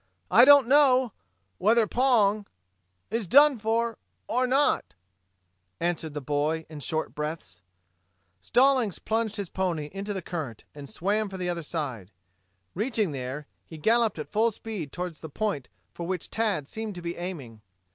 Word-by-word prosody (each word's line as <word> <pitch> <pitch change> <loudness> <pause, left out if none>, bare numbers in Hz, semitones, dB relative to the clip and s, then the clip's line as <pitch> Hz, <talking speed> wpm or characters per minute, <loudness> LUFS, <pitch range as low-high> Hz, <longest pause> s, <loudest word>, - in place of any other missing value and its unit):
I 235 +7 +8
don't 285 -3 +8
know 260 -4 +4 0.5
whether 225 +2 +4
Pong 215 -4 +2 0.6
is 225 -3 -1
done 285 - +6
for 225 +1 0 0.3
or 250 +3 +1
not," 275 +3 +1 0.8
answered 165 -3 -2
the 150 - -3
boy 150 +3 -1
in 155 -2 -8
short 155 +3 -3
breaths. 150 - -6 0.8
Stallings 250 - +3
plunged 220 -1 -1
his 200 -5 -4
pony 170 -6 -2
into 200 +1 -4
the 190 -3 -4
current 150 -12 -5
and 145 -2 -9
swam 205 +3 -1
for 190 - -7
the 180 -1 -2
other 170 -1 -2
side. 140 - -5 0.6
Reaching 215 - 0
there, 135 +2 -5 0.2
he 160 - -11
galloped 225 +5 +2
at 150 - -7
full 225 +2 +3
speed 210 -9 -6
toward 180 -1 -4
the 160 - -9
point 170 - -2 0.2
for 170 - -6
which 185 -2 -4
Tad 210 -11 -1
seemed 220 +1 -5
to 175 - -8
be 170 0 -3
aiming. 145 - -7
190 Hz, 155 wpm, -27 LUFS, 155-225 Hz, 0.8 s, I